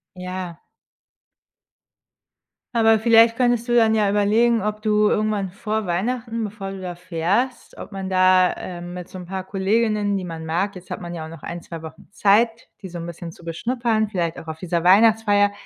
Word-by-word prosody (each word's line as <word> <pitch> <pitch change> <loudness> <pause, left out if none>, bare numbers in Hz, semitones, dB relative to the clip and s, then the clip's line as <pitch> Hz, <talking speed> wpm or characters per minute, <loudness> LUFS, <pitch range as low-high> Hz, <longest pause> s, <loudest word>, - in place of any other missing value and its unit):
Ja. 180 -1 -6 2.1
Aber 225 -1 +4
vielleicht 230 0 +5
könntest 240 -1 +1
du 240 - 0
dann 225 -2 +4
ja 210 -2 +2
überlegen, 220 +3 +3
ob 210 0 -3
du 210 -1 +3
irgendwann 210 -2 0
vor 210 +2 -3
Weihnachten, 230 +6 -2
bevor 205 -2 -6
du 195 - -7
da 180 -1 -5
fährst 180 +9 -2
ob - - -9
man 195 -1 -5
da, 185 0 +5
äh, 180 -1 -7
mit 175 0 -8
so - - -9
'n 180 - -8
paar 190 +1 -5
Kolleginnen, 205 +2 0
die 190 - -4
man 165 -2 -6
mag 180 +5 -1
jetzt 185 0 -12
hat - - -5
man 175 0 -6
ja 160 -2 -5
auch - - -9
noch 165 -2 -11
1, 170 0 -7
2 165 -2 -8
Wochen 160 0 -11
Zeit, 225 +3 +2
die 190 - -6
so 175 0 -7
'n 170 - -6
bisschen 170 0 -7
zu 170 - -17
beschnuppern, 225 +5 -1
vielleicht 170 -5 -2
auch 160 - -12
auf 160 0 -6
dieser 170 -1 -2
Weihnachtsfeier 205 +1 +5
195 Hz, 190 wpm, -22 LUFS, 175-220 Hz, 2.1 s, vielleicht